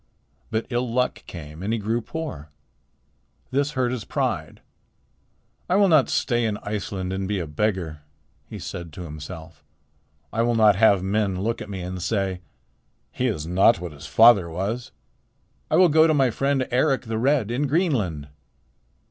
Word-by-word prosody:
But 110 +1 -1
ill 120 0 -1
luck 125 +1 0
came, 80 -1 -9
and 100 +3 -2
he 115 - +1
grew 110 +3 -1
poor. 135 - -6 1.0
This 140 +2 0
hurt 130 -3 0
his 125 -4 -3
pride. - - -3 1.1
'I 180 - +3
will 200 0 +5
not 155 -5 +4
stay 120 -1 +1
in 110 -2 -1
Iceland 100 -3 -3
and 95 0 -3
be 105 0 -1
a 85 - -2
beggar,' 80 -1 -2 0.5
he - - -7
said 85 -3 -7
to 90 - -7
himself. 80 +1 -9 0.7
'I 115 - +1
will 120 0 +2
not 110 -3 +5
have 100 -2 +4
men 95 -1 0
look 115 +2 -1
at - - -7
me 95 -2 -5
and 90 0 -5
say, 95 -1 -1 0.7
"He 130 - -1
is 90 -10 -2
not 95 +6 +4
what 90 -1 -6
his 75 +1 -10
father 110 -6 +6
was." 100 +8 -3 0.8
I - - +2
will 185 - +7
go 160 0 +5
to 155 - +2
my 135 -4 +3
friend 135 +2 0
Eric 135 +2 +2
the 110 -1 -3
Red 130 -3 +2
in 140 +4 0
Greenland.' 125 - 0
110 Hz, 170 wpm, -24 LUFS, 90-125 Hz, 1.1 s, will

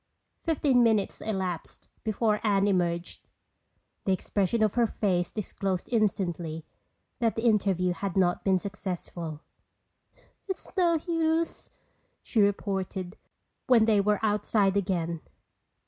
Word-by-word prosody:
Fifteen 285 -6 +2
minutes 220 -4 +2
elapsed 190 -5 -4 0.2
before 215 -1 +1
Anne 200 -2 +3
emerged. 175 -3 -1 0.8
The 195 - +2
expression 200 +4 +1
of 215 - +2
her 240 -1 +3
face 180 -5 0
disclosed 195 -3 -3
instantly 175 -7 0 0.5
that 230 -2 +1
the 225 - -3
interview 190 -5 +2
had 195 0 -4
not 175 -2 +2
been 190 -1 +3
successful. 175 -5 -5 1.1
"It's 380 - -5
no 350 -3 +3
use," 330 0 0 0.5
she 225 - +1
reported 195 -2 -1 0.5
when 240 -4 +6
they 215 -2 +4
were 210 +1 +2
outside 210 -2 +2
again. 170 -4 -1
200 Hz, 115 wpm, -28 LUFS, 180-220 Hz, 1.1 s, when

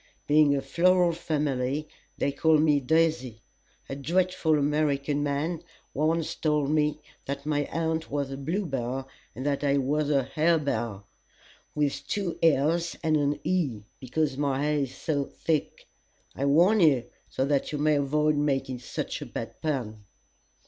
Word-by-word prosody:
Being 150 -1 +4
a 135 - -1
floral 180 0 +3
family, 150 -3 -2 0.3
they 140 - 0
call 160 +2 +3
me 150 -1 +3
Daisy. 130 -6 0 0.4
A 135 - -5
dreadful 165 +1 +1
American 145 -1 0
man 145 +4 -1 0.3
once 160 +2 0
told 150 -2 0
me 150 -1 +1 0.3
that 140 +1 -5
my 145 -1 0
aunt 160 0 -2
was 140 -1 -2
a 135 - -5
Bluebell 135 - -3 0.3
and 130 - -6
that 145 0 0
I 140 0 +2
was 145 +2 0
a 140 -2 +3
Harebell 140 -9 0 0.7
with 145 -2 -1
two 195 -5 -2
l's 165 +2 +2
and 160 -1 +2
an 145 -1 +1
e 145 - -1 0.2
because 135 +1 -1
my 140 -1 0
hair 150 0 +1
is 135 -2 -3
so 145 -3 -1
thick. 155 0 -3 0.5
I 140 - -2
warn 175 +10 +4
you, 145 -9 +4 0.2
so 130 - -1
that 140 -1 0
you 150 - -2
may 150 +1 +2
avoid 150 +2 +1
making 135 -3 -1
such 120 - -5
a - - -6
bad - - -7
pun." 120 -9 -3
145 Hz, 150 wpm, -27 LUFS, 140-160 Hz, 0.7 s, Being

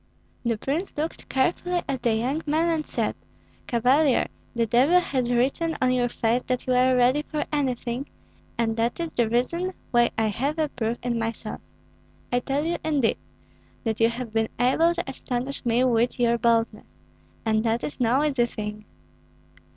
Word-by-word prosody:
The 235 -2 0
prince 295 - -3
looked 315 +2 -4
carefully 350 +6 0
at 265 -3 -2
the 235 -2 +2
young 260 +8 -1
man 320 +3 +2
and 320 -2 -1
said, - - -1 0.5
"Cavalier, 255 +4 +3 0.3
the 230 -1 +2
devil 265 +11 +4
has 255 -8 -1
written 275 +7 +1
on 255 0 +3
your 245 -1 +1
face 235 +1 +1
that 250 -1 -1
you 255 - +1
are 255 +1 +4
ready 250 +4 +4
for 300 0 -3
anything, 255 -2 -1 0.5
and 225 -1 0
that 230 +5 0
is 335 -1 -3
the 235 -2 +1
reason 335 +11 0 0.2
why 240 -1 +4
I 225 - +2
have 265 +9 -1
a 310 -2 +1
proof 235 -3 -2
in 240 -1 -1
myself. 225 0 -4 0.7
I 245 - +3
tell 275 +4 -1
you, 340 +1 0
indeed, 290 -7 +1 0.7
that 220 -2 -1
you 230 0 +5
have 235 -1 -6
been 225 0 +1
able 320 +8 +3
to 345 - -3
astonish 265 0 -4
me 235 +2 +3
with 240 0 +2
your 235 -1 +3
boldness, 230 -2 +1 0.6
and 220 -1 +2
that 230 0 0
is 290 - -5
no 250 +4 +3
easy 270 -5 +2
thing." 210 -2 -6
250 Hz, 175 wpm, -25 LUFS, 235-290 Hz, 0.7 s, you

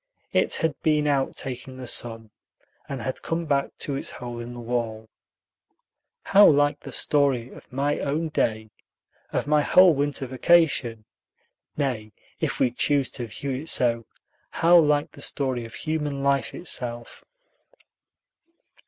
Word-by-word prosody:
It - - +2
had 160 -2 0
been 150 -1 +2
out 140 -2 +1
taking 130 0 -6
the 130 - -7
sun, 115 -2 -1 0.6
and 135 -4 -5
had 130 - -4
come 165 +1 -2
back 140 -2 -1
to 140 - -3
its 135 - -3
hole 120 -1 -7
in 120 +1 -7
the - - -8
wall. 115 -2 -3 1.2
How 205 +1 +7
like 145 0 +3
the - - -10
story 135 -5 +1
of - - -15
my 140 +3 0
own 155 +3 -1
day, 110 -7 -1 0.6
of - - -1
my 150 0 +3
whole 180 +3 +6
winter 145 -1 -1
vacation! 130 -5 +2 0.7
Nay, 120 -7 -2 0.3
if - - -2
we 125 - +3
choose 140 +2 +1
to 120 -3 -5
view 135 +5 -5
it 140 +5 -4
so, 115 -3 +1 0.4
how 170 +1 +4
like 150 -2 +2
the 140 - -12
story 130 -4 -2
of 115 - -10
human 150 -3 -3
life 140 -1 +1
itself! 120 -8 -5
135 Hz, 145 wpm, -25 LUFS, 120-150 Hz, 1.2 s, How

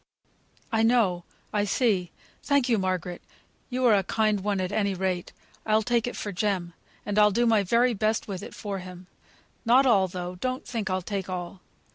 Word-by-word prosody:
"I 225 -1 +2
know 225 -7 +2 0.3
I 205 -1 +2
see. 205 -4 +1 0.3
Thank 280 -3 +2
you, 230 -4 +2
Margaret; 185 -2 -2 0.5
you're 250 -3 +3
a 200 - +4
kind 215 +2 +1
one, 200 0 -1
at 185 0 -2
any 200 -2 0
rate. 185 -1 -2 0.3
I 215 0 +3
take 240 +1 +1
it 245 - -4
for 205 - -4
Jem; 185 -3 -1 0.3
and 205 0 0
I'll 210 0 +7
do 235 +4 +1
my 225 -3 +4
very 235 +6 +2
best 215 +1 0
with 195 -3 -5
it - - -9
for 200 -2 -4
him. 180 0 -10 0.6
Not 250 +3 +5
all, 200 -7 +4
though; 180 0 -5
don't 255 +6 -3
think 225 -5 -3
I'll 185 0 -1
take 195 0 -4
all. 180 0 -5
205 Hz, 185 wpm, -26 LUFS, 185-230 Hz, 0.6 s, I'll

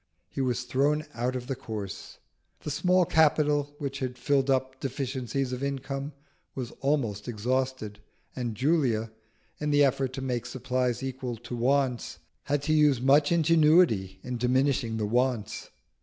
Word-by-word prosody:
He - - -4
was 125 -1 0
thrown 140 +5 +1
out 125 +2 -2
of 125 -1 -4
the 135 +1 -3
course. 105 -4 -7 0.4
The 150 - -4
small 180 +4 +3
capital 150 -2 +2
which 140 -1 -4
had 125 -1 -4
filled 135 +1 +1
up 130 0 0
deficiencies 130 -1 -3
of 125 - -4
income 140 +1 -3 0.4
was 125 -3 -4
almost 125 -8 -1
exhausted, 125 -1 -2 0.4
and 120 -4 -3
Julia, 125 -5 +1 0.5
in 150 - -1
the 145 0 +5
effort 135 -1 +1
to 135 - -5
make 125 -2 -2
supplies 125 0 -1
equal 130 -2 -4
to 120 +2 -7
wants, 130 0 0 0.3
had 145 0 0
to 155 +1 +1
use 150 -4 +4
much 140 +4 +4
ingenuity 155 - +4
in 125 -1 -4
diminishing 125 -2 +1
the 110 - -1
wants. 115 -1 -1
130 Hz, 150 wpm, -28 LUFS, 120-145 Hz, 0.5 s, the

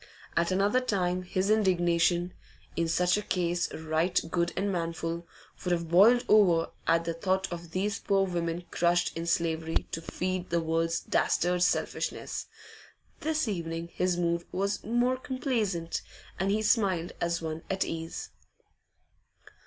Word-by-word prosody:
At 170 0 +2
another 200 +6 +3
time 185 -6 0
his 185 +2 0
indignation 175 -3 +2 0.4
in 165 0 +1
such 180 +3 +2
a - - -1
case 175 -3 -1
right 160 +3 0
good 170 0 +1
and 200 +1 0
manful 170 -1 -3 0.4
would 180 - -1
have 170 -2 0
boiled 230 +8 +6
over 180 -6 +4 0.2
at 165 0 +3
the 165 - -1
thought 190 +2 -1
of 170 -1 -7
these 200 +4 -1
poor 195 -1 +2
women 170 -1 -2
crushed 175 0 +2
in 165 +1 -4
slavery 165 -1 0
to 165 - -3
feed 185 +2 -3
the 170 - +2
world's 165 +1 0
dastard 180 +1 +1
selfishness; - - -1 0.7
this 310 -3 0
evening 170 -4 -3
his 180 -1 0
mood 170 -1 0
was 200 +2 -1
more 240 +3 +1
complaisant, 230 - -2 0.4
and 190 +2 +1
he 215 +2 +1
smiled 190 -6 +2
as 170 0 0
one 160 -1 -4
at 190 0 0
ease. 165 0 -5
175 Hz, 145 wpm, -29 LUFS, 170-195 Hz, 0.7 s, boiled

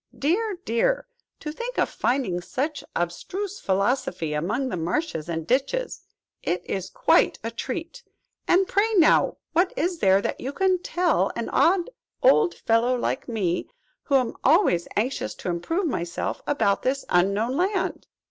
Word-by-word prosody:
Dear, 385 +7 0
dear! - - +1 0.4
to 300 - -4
think 475 +10 -6
of - - +3
finding 240 -9 -1
such 290 - -3
abstruse 370 - -3
philosophy 190 - 0
among 215 - -1
the - - -3
marshes 175 - -2
and 165 -1 -3
ditches! 280 - -1 0.4
It 175 +1 -2
is 190 -2 -3
quite - - +3
a 230 - -3
treat! 330 - -5 0.5
And 375 +2 +4
pray, 430 +4 +1
now, 335 -5 +4 0.2
what 350 +3 +3
is 345 +2 -1
there 195 -1 +5
that - - -3
you 270 +3 -4
can 375 0 +2
tell 355 -1 +1
an - - -3
odd 360 +5 +3 0.3
old 450 -7 +5
fellow 230 +3 +2
like 260 - -2
me, 190 -7 -1 0.4
who 280 - +1
am 255 -3 +2
always 275 - +4
anxious 240 +6 -1
to - - -5
improve 325 - -1
myself, 170 - -3
about 210 -8 +1
this 270 +2 -1
Unknown 200 +8 +2
Land?" 380 +4 -1
270 Hz, 150 wpm, -25 LUFS, -, 0.5 s, there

